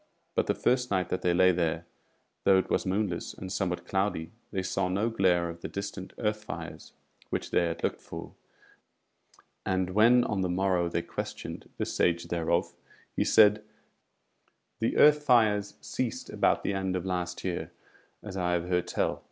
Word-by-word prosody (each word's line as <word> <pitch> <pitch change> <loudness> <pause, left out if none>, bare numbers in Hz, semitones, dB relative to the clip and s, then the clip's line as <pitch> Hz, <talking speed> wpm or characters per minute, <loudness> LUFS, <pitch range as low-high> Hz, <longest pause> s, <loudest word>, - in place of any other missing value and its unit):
But - - +1
the - - +1
first 125 0 +1
night 90 -3 0
that 90 - -1
they 90 - +2
lay 95 +1 +6
there, 85 -1 -1 0.6
though 95 -1 +6
it 95 - -1
was - - +1
moonless 95 -2 -1
and 95 0 -7
somewhat 90 -3 -2
cloudy, 95 -4 -1 0.2
they 95 -2 -2
saw 95 - 0
no 100 +5 0
glare 90 -5 +2
of 85 0 -8
the - - -4
distant 100 -1 -6
earth 105 -1 -1
fires - - -8 0.4
which - - -3
they 85 - +3
had 85 - -4
looked - - -1
for; - - -8 1.3
and 95 -1 0
when 115 +5 +5
on 105 -4 -1
the 90 - 0
morrow 90 -1 +1
they 85 0 -1
questioned - - -6
the - - -1
Sage 85 0 0
thereof, 85 -2 0 0.4
he - - +2
said: 105 -1 +5 1.2
"The 115 - 0
Earth 150 0 +7
fires 110 -7 +3
ceased - - -3
about - - +2
the 100 - 0
end 95 -1 -1
of 90 0 -3
last 90 -1 -3
year, 90 -2 -3 0.5
as 105 -3 -7
I 90 -2 0
have 85 0 -1
heard 90 -1 +1
tell. - - -1
95 Hz, 175 wpm, -29 LUFS, 90-105 Hz, 1.3 s, Earth